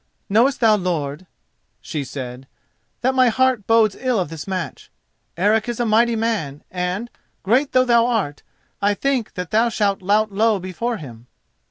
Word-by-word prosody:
"Knowest 245 Hz, +7 st, +3 dB
thou, 220 Hz, -2 st, +5 dB
lord," 170 Hz, -3 st, -3 dB, 0.5 s
she 150 Hz, -, -4 dB
said, 130 Hz, -1 st, -7 dB, 0.5 s
"that 260 Hz, +2 st, +2 dB
my 255 Hz, -1 st, +4 dB
heart 260 Hz, -2 st, +1 dB
bodes 225 Hz, -3 st, +4 dB
ill 250 Hz, -4 st, 0 dB
of 180 Hz, -, -2 dB
this 160 Hz, 0 st, -7 dB
match? 185 Hz, -2 st, -5 dB, 0.5 s
Eric 215 Hz, +6 st, +2 dB
is 240 Hz, -, -4 dB
a 240 Hz, -, +1 dB
mighty 230 Hz, +2 st, +3 dB
man, 215 Hz, -11 st, -2 dB
and, 180 Hz, +5 st, -2 dB, 0.4 s
great 255 Hz, +8 st, +2 dB
though 255 Hz, 0 st, +4 dB
thou 235 Hz, -1 st, +4 dB
art, 200 Hz, -12 st, -1 dB, 0.4 s
I 205 Hz, +1 st, +2 dB
think 265 Hz, -2 st, -1 dB
that 180 Hz, -1 st, -5 dB
thou 225 Hz, +2 st, +3 dB
shalt 205 Hz, -4 st, 0 dB
lout 210 Hz, +3 st, +2 dB
low 215 Hz, +2 st, +2 dB
before 195 Hz, +6 st, -3 dB
him." 120 Hz, -, -11 dB
215 Hz, 165 wpm, -21 LUFS, 180-235 Hz, 0.5 s, thou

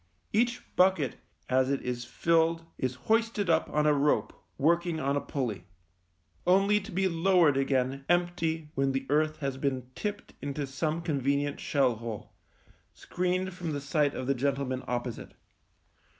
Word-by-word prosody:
Each 235 Hz, +3 st, +1 dB
bucket 180 Hz, -7 st, +3 dB, 0.3 s
as 130 Hz, 0 st, +2 dB
it 140 Hz, -, +1 dB
is 120 Hz, -1 st, -3 dB
filled 165 Hz, +4 st, +1 dB
is 130 Hz, -1 st, -1 dB
hoisted 225 Hz, -4 st, +2 dB
up 160 Hz, 0 st, +2 dB
on 150 Hz, 0 st, +1 dB
a 150 Hz, -, +5 dB
rope 145 Hz, +1 st, +1 dB, 0.2 s
working 170 Hz, +2 st, +2 dB
on 140 Hz, 0 st, 0 dB
a 145 Hz, -, 0 dB
pulley 120 Hz, -10 st, -3 dB, 0.4 s
— 85 Hz, -, -29 dB
only 205 Hz, +1 st, +3 dB
to 210 Hz, +2 st, -10 dB
be 190 Hz, +1 st, +1 dB
lowered 170 Hz, -3 st, +4 dB
again 135 Hz, 0 st, 0 dB
empty 165 Hz, -3 st, 0 dB
when 135 Hz, -2 st, +1 dB
the 135 Hz, 0 st, -2 dB
earth 155 Hz, +1 st, +2 dB
has 135 Hz, -2 st, -2 dB
been 130 Hz, -2 st, -2 dB
tipped 205 Hz, +5 st, -5 dB
into 145 Hz, 0 st, -3 dB
some 155 Hz, +4 st, -2 dB
convenient 140 Hz, -2 st, 0 dB
shell 130 Hz, -5 st, +1 dB
hole, 115 Hz, -2 st, -7 dB, 0.6 s
screened 185 Hz, +1 st, -2 dB
from 175 Hz, -3 st, -4 dB
the 145 Hz, -, -2 dB
sight 145 Hz, 0 st, +1 dB
of 130 Hz, -, -4 dB
the 140 Hz, -, +2 dB
gentlemen 135 Hz, -1 st, -1 dB
opposite. 120 Hz, -1 st, -4 dB
145 Hz, 155 wpm, -29 LUFS, 135-170 Hz, 0.6 s, a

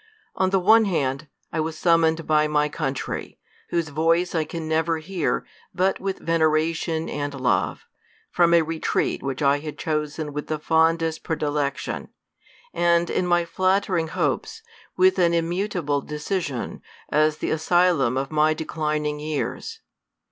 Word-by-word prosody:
On 190 Hz, -, +1 dB
the 195 Hz, -, +2 dB
one 220 Hz, +4 st, +5 dB
hand, 140 Hz, -6 st, -1 dB, 0.3 s
I 160 Hz, -, -1 dB
was 155 Hz, 0 st, -2 dB
summoned 165 Hz, -1 st, +3 dB
by 155 Hz, 0 st, +3 dB
my 150 Hz, 0 st, +1 dB
country, 140 Hz, -3 st, -4 dB, 0.3 s
whose 170 Hz, -2 st, -1 dB
voice 165 Hz, +4 st, +1 dB
I 160 Hz, -2 st, 0 dB
can 165 Hz, 0 st, -6 dB
never 160 Hz, +1 st, +1 dB
hear 170 Hz, +1 st, -2 dB, 0.3 s
but 190 Hz, +2 st, +1 dB
with 195 Hz, 0 st, -3 dB
vene 165 Hz, -1 st, -1 dB
ration 160 Hz, +1 st, +1 dB
and 145 Hz, -1 st, -4 dB
love, 130 Hz, -, 0 dB, 0.5 s
from 170 Hz, -1 st, +4 dB
a 170 Hz, -, +5 dB
retreat 160 Hz, 0 st, -1 dB
which 135 Hz, +1 st, -3 dB
I 140 Hz, +1 st, +3 dB
had 150 Hz, 0 st, -7 dB
chosen 150 Hz, -1 st, -3 dB
with 150 Hz, 0 st, -4 dB
the 155 Hz, -, -1 dB
fondest 160 Hz, +1 st, +1 dB
predilection, 145 Hz, -3 st, -2 dB, 0.7 s
and, 170 Hz, 0 st, +2 dB
in 180 Hz, -, 0 dB
my 175 Hz, -1 st, +3 dB
flattering 185 Hz, -1 st, +1 dB
hopes, 450 Hz, -, -2 dB, 0.3 s
with 375 Hz, +1 st, +4 dB
an 170 Hz, -1 st, +3 dB
immutable 170 Hz, -4 st, -1 dB
decision, 150 Hz, -, -4 dB, 0.3 s
as 155 Hz, +1 st, +3 dB
the -, -, -2 dB
asylum 160 Hz, -6 st, +2 dB
of 135 Hz, +2 st, -2 dB
my 155 Hz, 0 st, +3 dB
declining 150 Hz, -1 st, -2 dB
years. 155 Hz, -, -4 dB
160 Hz, 145 wpm, -24 LUFS, 150-175 Hz, 0.7 s, one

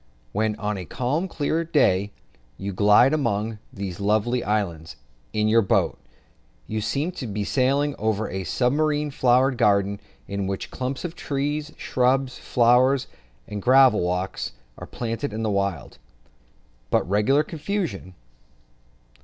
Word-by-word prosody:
When 110 Hz, -, 0 dB
on 105 Hz, -1 st, -3 dB
a 90 Hz, -, -6 dB
calm, 135 Hz, -, -1 dB
clear 160 Hz, 0 st, -1 dB
day, 105 Hz, -, +2 dB, 0.5 s
you 100 Hz, 0 st, -4 dB
glide 105 Hz, +8 st, +5 dB
among 110 Hz, -6 st, -1 dB
these 100 Hz, -2 st, -6 dB
lovely 110 Hz, +4 st, +1 dB
islands, 85 Hz, -8 st, -2 dB, 0.4 s
in 105 Hz, 0 st, +1 dB
your 115 Hz, +1 st, +5 dB
boat, 95 Hz, -, +1 dB, 0.7 s
you 110 Hz, 0 st, -3 dB
seem 145 Hz, -, -1 dB
to 140 Hz, -9 st, -6 dB
be 105 Hz, 0 st, -3 dB
sailing 140 Hz, +5 st, +1 dB
over 110 Hz, 0 st, 0 dB
a 95 Hz, +1 st, -4 dB
submarine 145 Hz, -, 0 dB
flower 130 Hz, +1 st, +3 dB
garden, 100 Hz, -4 st, +1 dB, 0.3 s
in 100 Hz, -1 st, -3 dB
which 95 Hz, 0 st, -4 dB
clumps 130 Hz, +5 st, -4 dB
of 170 Hz, -, -4 dB
trees, 145 Hz, +1 st, -2 dB
shrubs, 130 Hz, +1 st, 0 dB
flowers, 125 Hz, +3 st, +3 dB, 0.4 s
and 105 Hz, -1 st, -5 dB
gravel 130 Hz, -1 st, +6 dB
walks, 90 Hz, -4 st, -2 dB, 0.2 s
are -, -, -9 dB
planted 115 Hz, +1 st, -4 dB
in 110 Hz, +1 st, -3 dB
wild, 100 Hz, -4 st, -2 dB, 0.9 s
but -, -, +1 dB
regular 105 Hz, +10 st, +3 dB
confusion. 155 Hz, -, -4 dB
115 Hz, 130 wpm, -24 LUFS, 100-135 Hz, 0.9 s, gravel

